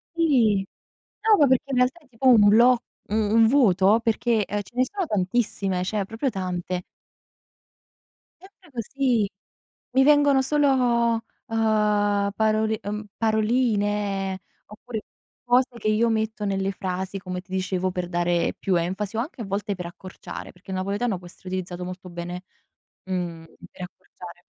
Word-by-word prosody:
Sì. 245 -12 +3 0.6
No, 435 -1 +5
ma 290 - +6
perché 260 -1 +3
in 255 - 0
realtà 250 +6 +2
è 300 - -25
tipo 255 +1 -2
un 220 -5 +7
bloc 235 +4 +6 0.3
un 220 +1 +3
vuoto, 215 -4 +4
perchè, 225 -1 +1
ehm, 205 +1 -2
ce 205 - -16
ne 255 - +3
sono 395 +4 -3
tantissime, 195 - -1
cioè 205 +1 -1
proprio 225 +7 -2
tante. 180 -3 -3 1.6
Sempre 380 -3 -19
così. 245 -2 0 0.6
Mi 265 +2 +4
vengono 290 -1 +5
solo, 290 +1 +2 0.7
uhm, 210 -3 +1
parol 220 0 +1
uhm, 210 +1 -4
paroline, 210 -4 0 0.3
oppure 220 +1 -7 0.4
cose 245 +1 +3
che 220 - -4
io 220 +2 +3
metto 220 -1 -1
nelle 195 -1 0
frasi, 190 0 -4
come 180 -1 -5
ti 185 - -23
dicevo, 185 0 -1
per 180 -1 -3
dare 175 -1 +1
più 190 - 0
enfasi 190 +5 -2
o - - +1
anche 255 +1 -5
a - - -4
volte 200 +1 -2
per 180 -1 -6
accorciare, 185 +2 -9
perché 180 +2 -13
il 190 - -2
napoletano 200 +3 -1
può 175 0 -12
essere 185 +1 -12
utilizzato 180 -1 -4
molto 180 +1 -8
bene, 175 +1 -6 0.6
mhmm, 175 -3 -4 0.3
per - - -11
accorciare. 180 -1 -11
210 Hz, 150 wpm, -24 LUFS, 185-240 Hz, 1.6 s, un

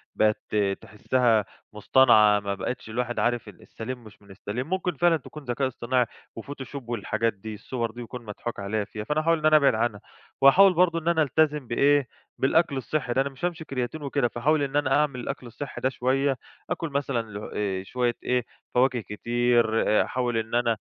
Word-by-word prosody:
بقيت 110 0 +3
ت - - -2 0.3
تحِسّها 110 +1 +1 0.3
مُصطنعة، 105 -2 +5
ما 100 -1 -3
بقيتش 110 +3 -5
الواحد 120 +2 -2
عارف 120 -2 0
السليم 120 +4 -8
مش 110 -2 -15
من 100 -1 -17
السليم، 105 +8 -5
ممكن 185 -2 -1
فعلًا 175 +1 +4
تكون 150 +1 -11
ذكاء 130 +2 0
اصطناعي 125 0 0 0.3
وفوتوشوب 135 0 -8
والحاجات 115 0 -1
دي، 110 +2 -8
الصور 115 +2 -4
دي 120 +2 -9
يكون 120 0 -8
مضحوك 110 +2 -6
عليّا 105 +2 -1
فيها، 105 0 -7
فأنا 150 +7 0
هاحاول 165 +1 +2
إن 155 - -4
أنا 155 0 +7
أبعد 140 -6 +4
عنها، 110 -2 -1 0.4
وهاحاول 185 +8 +7
برضو 170 -1 +3
إن 165 - -9
أنا 170 -2 +3
ألتزم 150 -1 +1
بإيه 140 +3 +3 0.3
بالأكل 140 +1 +2
الصحي 130 0 -2
ده، 130 - +3
أنا 140 - -1
مش 135 +5 -5
هامشي 170 -2 -3
بكرياتين 135 +1 -4
وكده، 140 -2 +1
فهاحاول 145 +6 +1
إن 140 0 -3
أنا 145 -2 +2
أعمل 145 -4 0
الأكل 125 0 -5
الصحي 130 +4 -7
دا 130 - +2
شوية، 135 +1 0 0.3
أكُل 165 - -2
مثلًا 140 -4 -1
ل 105 +1 -7
آآ 95 -2 -1
شوية 120 +4 -1
إيه 125 -1 0 0.3
فواكه 125 -1 +3
كتير، 120 +4 +1 0.4
أحاول 120 -2 -1
إن 115 +1 -2
أنا 120 -2 +2
125 Hz, 185 wpm, -26 LUFS, 115-140 Hz, 0.4 s, أنا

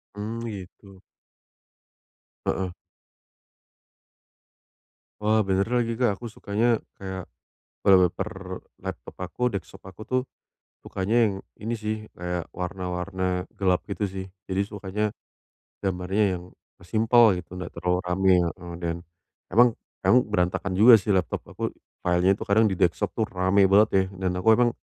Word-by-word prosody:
Hmm, 110 +3 -4
gitu. 95 -1 -10 1.5
Heeh. 90 -2 -1 2.5
Wah 110 -1 +3
benar 95 0 +2
lagi, 120 -2 +1
Kak. 115 -4 +1
Aku 120 - -7
sukanya 110 +1 0 0.2
kayak 95 -2 -6 0.6
wallpaper 90 -3 +2 0.2
laptop - - -7
aku, 90 - -9
desktop 100 -7 -6
aku 95 +2 -12
tuh, 130 +3 0 0.6
sukanya 100 +4 -1
yang 100 -3 +1 0.2
ini 110 +3 -4
sih, 110 -1 -2 0.2
kayak 90 -1 -3
warna-warna 90 0 -3
gelap 95 -2 +2
gitu 100 0 -2
sih. 95 -1 -4 0.2
Jadi, 95 0 -1
sukanya 105 0 -3 0.8
gambarnya 95 +1 0
yang 90 - -7 0.4
simpel 110 +4 +5
gitu, 90 +1 -11
nggak 90 -1 -6
terlalu 90 0 +1
ramai, 95 +1 +3
heeh. 85 +1 -5
Dan 85 0 -1 0.5
emang 120 +2 +5 0.3
emang 125 - +6
berantakan 90 -2 0
juga 110 +3 +8
sih 100 +2 -1
laptop 90 -3 -1
aku, - - -3 0.3
file-nya 90 +2 +3 0.3
di 95 - 0
desktop 85 -1 +1
itu 110 - +1
rame 95 +2 +2
banget 105 +3 +5
ya 95 -1 +4 0.2
dan 90 - +2
aku 110 +4 +5
emang 120 0 +3
95 Hz, 130 wpm, -26 LUFS, 90-110 Hz, 2.5 s, juga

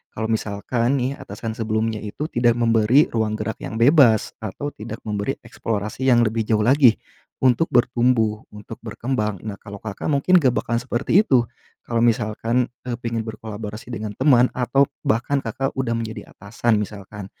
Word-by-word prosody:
Kalau 110 +1 -2
misalkan 115 +4 -1
nih 135 +1 -2
atasan 110 +3 -6
sebelumnya 110 0 -1
itu 105 +7 -6
tidak 120 -1 +3
memberi 115 +4 +3
ruang 110 -2 0
gerak 110 0 -4
yang - - -6
bebas, 120 -2 +5
atau 110 +7 -5
tidak 110 -1 -9
memberi 105 -1 -2
eksplorasi 110 +4 -3
yang 120 -2 +5
lebih 110 -1 -1
jauh 110 -2 +2
lagi 130 -1 +5 0.5
untuk 130 +5 +4
bertumbuh, 120 -3 +2
untuk 105 -1 -9
berkembang, 110 -6 -3
nah 105 -2 -5
kalau 100 -1 -10
Kakak 105 -2 -5
mungkin 155 +5 +4
gak 130 -6 +2
bakalan 115 0 -1
seperti 125 +8 +1
itu. 125 -3 +4 0.4
Kalau 115 - -3
misalkan, 115 +1 +1 0.2
eee, 125 - -3
pengen 115 -2 -3
berkolaborasi 110 0 -7
dengan 110 -3 -5
teman 125 0 +4
atau 130 +3 +2 0.2
bahkan 125 +5 0
Kakak 135 +4 -3
udah 120 -3 -1
menjadi 110 -2 -6
atasan 110 +2 -1
misalkan. 105 -1 -6
115 Hz, 160 wpm, -22 LUFS, 110-125 Hz, 0.5 s, bebas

